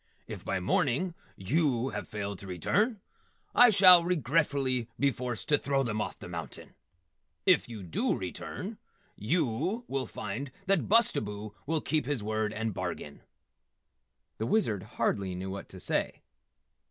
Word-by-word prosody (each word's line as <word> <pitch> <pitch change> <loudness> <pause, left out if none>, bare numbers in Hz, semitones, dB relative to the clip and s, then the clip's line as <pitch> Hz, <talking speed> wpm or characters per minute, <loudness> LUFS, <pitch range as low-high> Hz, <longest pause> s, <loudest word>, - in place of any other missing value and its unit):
If - - -8
by - - -1
morning 135 - +1 0.2
yew 130 - +1
have - - -5
failed 100 -2 -4
to 100 - -9
return, 200 - 0 0.5
I 245 0 +8
shall 185 -4 +8
regretfully 140 -6 +1
be 140 0 +4
forced 125 -1 -4
to 145 - +4
throw 135 -1 +1
them 110 -3 -1
off - - -4
the - - -9
mountain. - - -7 0.7
If - - +4
yew 110 -4 -7
dew 85 - 0
return, - - -6 0.4
yew 160 - 0
will 135 -3 -2
find 110 +8 -5 0.2
that 195 -3 +2
Bustabo 105 - +2
will 160 0 0
keep 155 0 0
his 145 -7 -1
word 110 0 -1
and 110 0 -2
bargain." 90 -5 -5 1.2
The 110 - -1
Wizard 115 - +1 0.2
hardly 95 -2 0
knew 95 +1 -4
what 100 - -7
to - - -10
say. - - -1
125 Hz, 145 wpm, -30 LUFS, 105-160 Hz, 1.2 s, I